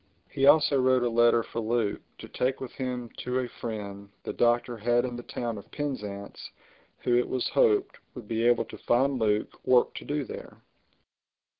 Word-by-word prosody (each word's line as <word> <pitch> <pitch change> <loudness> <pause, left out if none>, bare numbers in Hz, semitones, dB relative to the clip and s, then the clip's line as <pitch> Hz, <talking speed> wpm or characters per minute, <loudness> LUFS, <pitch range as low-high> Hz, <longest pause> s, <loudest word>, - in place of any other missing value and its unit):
He 135 0 +2
also 145 -2 +5
wrote 130 -1 +3
a 120 - +1
letter 120 0 +4
for 115 - -5
Luke 115 -2 0 0.2
to - - -10
take 130 +1 -1
with 130 - -6
him 125 -2 -4
to 125 +1 -2
a 130 -1 -1
friend 100 -4 -7
the - - -4
Doctor 120 0 +2
had 120 +2 +1
in 125 -1 -4
the 120 - -6
town 120 -2 -4
of - - -15
Penzance 105 -9 -5 0.5
who, 120 - +2
it 125 - +2
was 130 -1 -1
hoped, 415 -5 +2 0.2
would 120 -5 -9
be 115 +1 -1
able 120 -1 +3
to - - -11
find 130 +2 +2
Luke 105 -1 -1
work 125 -1 +4
to - - -7
do 145 0 -2
there. - - -10
120 Hz, 185 wpm, -28 LUFS, 115-130 Hz, 0.5 s, also